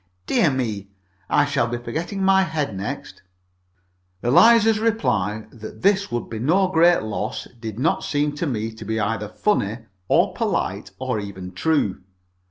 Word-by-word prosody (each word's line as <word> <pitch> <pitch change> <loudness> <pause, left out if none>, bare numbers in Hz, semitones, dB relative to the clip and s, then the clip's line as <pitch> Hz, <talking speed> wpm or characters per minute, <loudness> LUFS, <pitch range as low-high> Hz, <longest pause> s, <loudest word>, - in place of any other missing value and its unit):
Dear 155 - +3
me! 110 -7 -3 0.4
I 145 - +4
shall 140 -4 0
be 120 +1 -3
forgetting 165 - -4
my 190 0 +5
head 155 - -2
next." 95 - -6 1.0
Eliza's 225 - +5
reply 120 - 0
that 110 -2 -10
this 200 +1 +2
would 120 - -2
be 110 - -6
no 180 - +2
great 175 -3 +4
loss 110 0 -4
did 110 -2 -6
not 145 +7 +1
seem 145 0 0
to 165 - -1
me 110 -4 -2
to 110 0 -10
be 110 +1 -2
either 105 0 -2
funny, 115 - -1 0.2
or - - +3
polite, - - -2
or 110 - -2
even 95 -3 -7
true. 100 - 0
120 Hz, 155 wpm, -22 LUFS, 110-170 Hz, 1.0 s, my